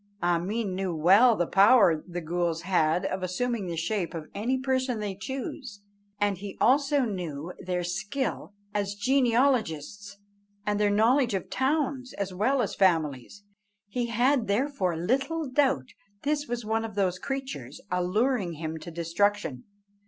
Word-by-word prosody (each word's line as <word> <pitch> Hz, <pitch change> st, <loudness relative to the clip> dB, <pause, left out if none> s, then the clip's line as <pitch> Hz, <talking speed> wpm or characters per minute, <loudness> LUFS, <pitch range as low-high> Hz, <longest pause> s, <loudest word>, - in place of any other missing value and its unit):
Ameen 185 Hz, +4 st, 0 dB
knew 185 Hz, -2 st, -2 dB
well 200 Hz, +10 st, +6 dB
the 175 Hz, -, +1 dB
power 195 Hz, -4 st, +5 dB
the 175 Hz, -1 st, -5 dB
ghools 170 Hz, 0 st, -1 dB
had 180 Hz, -1 st, +2 dB
of 190 Hz, -1 st, -2 dB
assuming 205 Hz, +3 st, -2 dB
the 170 Hz, -1 st, -4 dB
shape 175 Hz, +1 st, -2 dB
of 155 Hz, -2 st, -7 dB
any 235 Hz, +6 st, 0 dB
person 260 Hz, -2 st, 0 dB
they 205 Hz, -2 st, -3 dB
choose; 230 Hz, +1 st, -6 dB, 0.4 s
and 205 Hz, -3 st, +1 dB
he 200 Hz, 0 st, -7 dB
also 280 Hz, +3 st, +3 dB
knew 180 Hz, -, -4 dB
their 180 Hz, -1 st, -2 dB
skill 200 Hz, +9 st, -3 dB, 0.2 s
as 205 Hz, -1 st, -1 dB
genealogists, 225 Hz, -, +1 dB, 0.5 s
and 210 Hz, 0 st, 0 dB
their 210 Hz, -1 st, +3 dB
knowledge 230 Hz, +3 st, +3 dB
of 190 Hz, -, -4 dB
towns 265 Hz, -1 st, 0 dB
as 200 Hz, -2 st, -4 dB
well 245 Hz, +8 st, +2 dB
as 205 Hz, -, -3 dB
families; 165 Hz, -, 0 dB, 0.5 s
he 240 Hz, +3 st, -2 dB
had 240 Hz, +2 st, +2 dB
therefore 200 Hz, -, 0 dB
little 275 Hz, -, 0 dB
doubt 260 Hz, -, +1 dB, 0.3 s
this 295 Hz, +1 st, 0 dB
was 240 Hz, -2 st, -4 dB
one 225 Hz, +1 st, 0 dB
of 220 Hz, -3 st, -6 dB
those 185 Hz, -3 st, 0 dB
creatures 260 Hz, -, -5 dB
alluring 185 Hz, +2 st, +1 dB
him 160 Hz, 0 st, -5 dB
to 170 Hz, -, -8 dB
destruction. 170 Hz, -3 st, -1 dB
205 Hz, 145 wpm, -27 LUFS, 175-250 Hz, 0.5 s, well